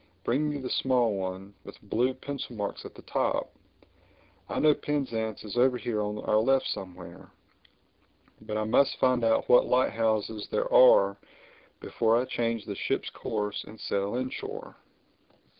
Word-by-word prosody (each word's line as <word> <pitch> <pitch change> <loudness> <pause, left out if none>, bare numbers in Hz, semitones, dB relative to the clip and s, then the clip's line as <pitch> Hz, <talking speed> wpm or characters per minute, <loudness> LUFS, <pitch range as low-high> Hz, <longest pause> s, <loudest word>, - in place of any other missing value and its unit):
Bring 145 +5 +1
me 145 - -3
the 130 -2 -5
small 125 -4 +2
one—with 95 +1 -7
blue 125 +5 0
pencil 140 -4 -6
marks 105 -2 -4
at - - -10
the - - -13
top. - - -1 1.0
I - - -3
know 150 -1 +5
Penzance 115 -8 -3
is 105 0 -7
over 125 0 +4
here 120 -3 -2
on 105 0 -4
our 105 - +3
left 135 +4 +2
somewhere. 90 -2 -7 1.1
But 105 - -4
I 110 - 0
must 125 +6 +2
find 130 -2 +2
out 115 0 +2
what 125 - +5
light 130 +1 +2
houses 110 -1 -1
there - - -1
are - - +6 0.6
before 115 0 +1
I 125 - -1
change 115 -3 -2
the 100 - -4
ship's - - -2
course 105 -2 -3
and 110 - -13
sail 100 +2 -2
inshore." 415 - -5
115 Hz, 155 wpm, -28 LUFS, 105-130 Hz, 1.1 s, are